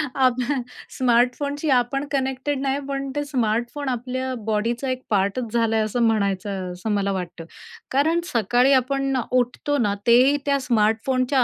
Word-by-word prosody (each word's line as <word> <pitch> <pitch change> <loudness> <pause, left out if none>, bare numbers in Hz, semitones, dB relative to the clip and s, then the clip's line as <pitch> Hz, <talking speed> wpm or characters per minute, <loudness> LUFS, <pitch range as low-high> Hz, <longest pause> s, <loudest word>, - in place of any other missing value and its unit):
आप 255 -2 +2
हं, 280 -3 0 0.4
स्मार्टफोनशी 260 +5 +1
आपण 260 +2 +1
कनेक्टेड 265 0 -1
नाही, 275 0 0
पण 275 0 -3
ते 290 - 0
स्मार्टफोन 245 +1 -1
आपल्या 255 +1 -3
बॉडीचा 230 +4 -1
एक 255 0 -2
पार्टच 205 +3 0
झाला 230 -1 +2
आहे 220 - +2
असं 225 +3 -2
म्हणायचं 200 -4 0
असं 180 +5 -4
मला 200 -1 0
वाटतं. 175 -3 -5 0.5
कारण 315 +5 +2
सकाळी 245 +4 +3
आपण 270 +1 +1
अ, - - +1
उठतो 255 +3 0
ना 210 -6 +1
तेही 255 +5 +6
त्या 280 -1 +2
स्मार्टफोनच्या 250 +2 +1
250 Hz, 150 wpm, -23 LUFS, 220-275 Hz, 0.5 s, तेही